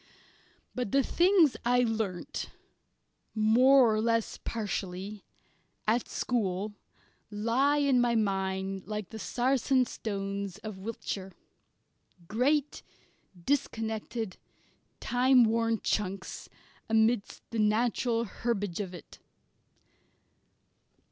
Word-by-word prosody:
But 250 Hz, -6 st, -3 dB
the 275 Hz, 0 st, +4 dB
things 345 Hz, -4 st, +4 dB
I 245 Hz, +1 st, +3 dB
learnt, 220 Hz, -6 st, -2 dB, 0.9 s
more 240 Hz, +3 st, +5 dB
or 215 Hz, -, +1 dB
less 230 Hz, 0 st, 0 dB
partially, 200 Hz, -2 st, -4 dB, 0.6 s
at 230 Hz, +3 st, +1 dB
school, 205 Hz, -4 st, -1 dB, 0.6 s
lie 235 Hz, +7 st, +1 dB
in 275 Hz, -4 st, +3 dB
my 240 Hz, -1 st, +2 dB
mind, 195 Hz, -2 st, -1 dB
like 210 Hz, -2 st, -4 dB
the 220 Hz, -, -7 dB
"Sarsen" 255 Hz, +2 st, +1 dB
stones 200 Hz, -3 st, -4 dB
of 215 Hz, -3 st, -6 dB
Wiltshire 195 Hz, -2 st, -5 dB, 0.9 s
great, 275 Hz, -, +1 dB, 0.6 s
disconnected, 225 Hz, -5 st, -2 dB, 0.6 s
time 250 Hz, 0 st, +4 dB
worn 230 Hz, 0 st, +1 dB
chunks 195 Hz, -2 st, -3 dB, 0.4 s
amidst 220 Hz, -1 st, +1 dB
the 230 Hz, -, -2 dB
natural 230 Hz, +2 st, +1 dB
herbage 205 Hz, -4 st, -3 dB
of 185 Hz, -3 st, -4 dB
it. 170 Hz, -, -13 dB
220 Hz, 90 wpm, -29 LUFS, 200-245 Hz, 0.9 s, more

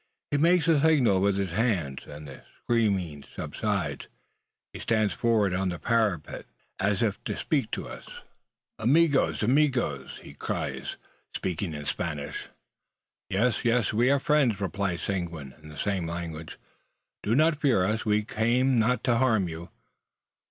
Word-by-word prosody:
He 145 Hz, -, +2 dB
makes 165 Hz, +2 st, +4 dB
a 160 Hz, -4 st, +4 dB
signal 130 Hz, -12 st, +4 dB
with 100 Hz, 0 st, +2 dB
his 95 Hz, -3 st, -1 dB
hands, 90 Hz, -, -1 dB
and 75 Hz, +1 st, -9 dB
the 65 Hz, -, -11 dB, 0.2 s
screaming 95 Hz, -11 st, 0 dB
subsides. -, -, -3 dB, 0.7 s
He -, -, -7 dB
stands 110 Hz, -4 st, +1 dB
forward 110 Hz, -4 st, +2 dB
on 95 Hz, +1 st, 0 dB
the 85 Hz, -, -3 dB
parapet, 105 Hz, -8 st, -1 dB, 0.3 s
as 100 Hz, +2 st, +1 dB
if 105 Hz, -3 st, -1 dB
to -, -, -3 dB
speak -, -, 0 dB
to -, -, -4 dB
us. -, -, -10 dB, 0.7 s
"Amigos, 140 Hz, +2 st, +3 dB
amigos!" 125 Hz, -, +1 dB
(friends!) -, -, -13 dB
cries -, -, -3 dB
he, -, -, -12 dB
speaking 90 Hz, -2 st, -3 dB
in 75 Hz, 0 st, -6 dB
Spanish. 75 Hz, -3 st, -4 dB, 0.8 s
"Yes, 110 Hz, +4 st, +1 dB
yes; 120 Hz, -3 st, +2 dB
we 120 Hz, +4 st, +3 dB
are 140 Hz, 0 st, +4 dB
friends," 135 Hz, -8 st, +2 dB
replies 95 Hz, -2 st, -2 dB
Seguin, 85 Hz, -8 st, -4 dB
in 75 Hz, -, -12 dB
the 75 Hz, -, -11 dB
same 95 Hz, 0 st, -1 dB
language. 80 Hz, -2 st, -6 dB, 0.6 s
"Do 110 Hz, +3 st, +1 dB
not 155 Hz, +1 st, +3 dB
fear 120 Hz, -11 st, +3 dB
us! 110 Hz, +3 st, 0 dB
We 105 Hz, 0 st, +2 dB
came 120 Hz, +4 st, +2 dB
not 125 Hz, +3 st, +2 dB
to 120 Hz, -2 st, +2 dB
harm 110 Hz, -7 st, +3 dB
you." 85 Hz, +1 st, -7 dB
105 Hz, 150 wpm, -27 LUFS, 85-125 Hz, 0.8 s, makes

